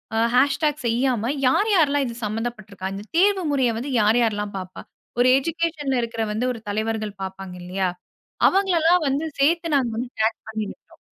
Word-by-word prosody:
அ - - +1 0.2
hash 275 +3 +3
talk 300 -1 0
செய்யாம 240 0 +1 0.2
யாரு 405 +12 +3
யாரெல்லாம் 290 -5 +3
இது 235 - -6
சம்பந்தப்பட்ருக்கா? 210 -3 -4
இந்த 200 +1 -7
தேர்வு 390 +1 +4
முறைய 260 -4 +2
வந்து 265 +5 -4
யார் 215 +3 +4
யார்ல்லாம் 210 -3 -1
பார்ப்பா? 185 -1 -7 0.4
ஒரு 245 - +5
எஜுகேஷன்ல 310 -3 -1
இருக்குற 230 -1 -3
வந்து 225 +4 -1
ஒரு 230 - -8
தலைவர்கள் 215 -1 -2
பார்ப்பாங்க 190 -1 -7
இல்லயா? 185 +1 -1 0.6
அவங்களல்லாம் 360 -3 +3
வந்து 280 +4 -1
சேர்த்து 330 +3 +2
நாங்க 260 -4 +2
வந்து 245 +1 -3
டாக் 220 +1 +2
பண்ணிவிட்டோம். 215 -2 -7
240 Hz, 160 wpm, -23 LUFS, 215-295 Hz, 0.6 s, ஒரு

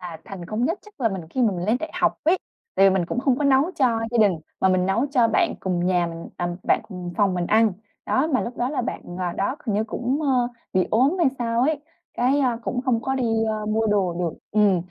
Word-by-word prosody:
Là 175 -3 -7
thành 190 -3 -8
công 220 +5 -1
nhất 335 +8 0
chắc 420 -8 -19
là 230 - +3
mình, 190 -4 -4
khi 255 - 0
mà 220 - +3
mình 175 -1 -3
lên 220 - +3
đại 320 - -4
học - - +2
ấy. 350 +4 +4 0.4
Tại 195 - +6
vì - - +1
mình 185 -3 +1
cũng 245 - -3
hông 265 -1 +2
có 295 - -1
nấu 270 -1 +5
cho 240 -5 +2
gia 240 - 0
đình 200 -6 +4 0.2
mà 190 - +4
mình 185 0 +2
nấu 230 +8 +1
cho 245 -5 +3
bạn 225 - +2
cùng 180 -1 -1
nhà 180 -2 +2
mình 165 0 -7
à, 175 0 -1
bạn - - +2
cùng 180 -3 -6
phòng 200 -3 +2
mình 175 -1 -1
ăn. 220 -1 +4 0.3
Đó, 270 - +2
mà 255 - +3
lúc 240 +1 -5
đó 245 - 0
là 280 -4 -1
bạn, - - -4 0.2
à, 175 -1 -1
đó, 200 +10 -1
hình 210 - 0
như 215 - +1
cũng, 250 +6 -2
ơ, 255 -4 +2 0.2
bị 185 -1 +2
ốm 265 - +3
hay 340 - +4
sao 230 -1 0
ấy, 300 +1 +1 0.3
cái, 260 +4 +2
a, 245 -3 +1
cũng 250 +2 -2
không 245 -4 +1
có 265 - -1
đi, 260 -2 0 0.2
ơ, 215 -1 -2
mua 220 +1 +1
đồ 195 -4 +1
được 170 -2 -2 0.2
ừm. 205 -4 +3
225 Hz, 265 wpm, -23 LUFS, 185-255 Hz, 0.4 s, Tại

